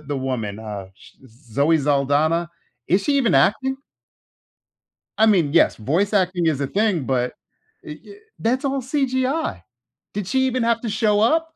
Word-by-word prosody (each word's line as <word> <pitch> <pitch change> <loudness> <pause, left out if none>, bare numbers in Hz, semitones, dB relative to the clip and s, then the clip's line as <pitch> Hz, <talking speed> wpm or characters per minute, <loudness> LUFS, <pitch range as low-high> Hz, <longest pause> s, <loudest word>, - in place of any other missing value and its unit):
the 145 - -2
woman, 125 -6 -3
uh, 105 -3 -7
sh - - -18 0.4
Zoe 155 +5 +3
Saldana, 150 +4 +1 0.4
is 185 +3 +2
she 290 - +1
even 245 - +2
acting? 240 - +2 1.4
I 220 - +5
mean, 175 -9 +2
yes, - - +4
voice 170 - -1
acting 180 -3 +1
is 145 -3 0
a 140 - -1
thing, 200 -6 0
but 125 -1 -1 0.5
i 150 - -8
y - - -13 0.3
that's 255 +4 0
all 275 -1 -1
CGI. 260 - -1 0.5
Did 205 -2 -4
she 265 +5 +1
even 255 -1 -1
have 230 0 +1
to 235 - -3
show 210 0 +1
up? 320 +7 +1
185 Hz, 160 wpm, -21 LUFS, -, 1.4 s, I